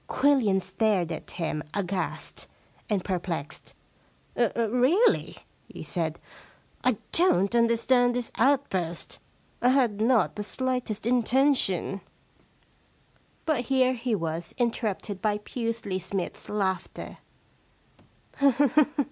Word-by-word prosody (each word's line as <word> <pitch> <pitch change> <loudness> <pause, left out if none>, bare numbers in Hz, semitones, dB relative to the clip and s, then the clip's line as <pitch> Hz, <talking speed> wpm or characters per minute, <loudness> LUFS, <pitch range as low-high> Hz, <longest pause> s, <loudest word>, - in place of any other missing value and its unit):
Quillian 255 -8 +3
stared 190 -3 0
at 160 - -6
him 160 -3 -3
aghast 190 -2 -4 0.4
and 200 -4 0
perplexed. 170 -5 -4 0.3
* - - -36
Really,' 245 - +2 0.3
he - - -9
said, 165 -2 -2 0.3
* - - -33
I 250 -4 +2
don't 200 - +4
understand 240 +1 +3
this 245 -2 -3
outburst. 205 -11 0 0.4
I 245 - +4
had 245 -6 +2
not 235 -1 +2
the 210 - -2
slightest 250 -2 -2
inten 250 +4 +3
tion 195 -3 -1 0.7
' - - -36
But 285 -7 0
here 260 0 +3
he 240 -2 -1
was 165 -2 -4
interrupted 220 -4 -2
by 210 -1 +1
Pusely 225 -3 -4
Smythe's 185 0 -5
laughter. 190 -3 -3
220 Hz, 105 wpm, -27 LUFS, 190-250 Hz, 0.7 s, don't